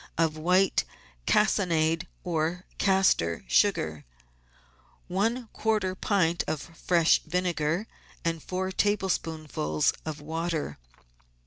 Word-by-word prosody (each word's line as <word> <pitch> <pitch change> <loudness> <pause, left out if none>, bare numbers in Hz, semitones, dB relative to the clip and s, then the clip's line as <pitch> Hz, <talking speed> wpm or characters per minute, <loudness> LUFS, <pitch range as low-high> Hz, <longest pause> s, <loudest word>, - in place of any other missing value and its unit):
of 160 -1 +2
white 180 +5 +3 0.4
cassonade 170 -5 +2 0.2
or 170 +1 -1
castor 190 - +2
sugar, 80 - +2 1.0
one 225 +6 0
quarter 215 -4 0
pint 185 -3 +1
of 155 - -1
fresh 165 +1 +2
vinegar, 175 +1 -1 0.4
and 165 -1 -1
four 185 +3 -3
tablespoonfuls 160 - 0
of 155 -1 -5
water. 160 - -3
170 Hz, 90 wpm, -28 LUFS, 155-190 Hz, 1.0 s, white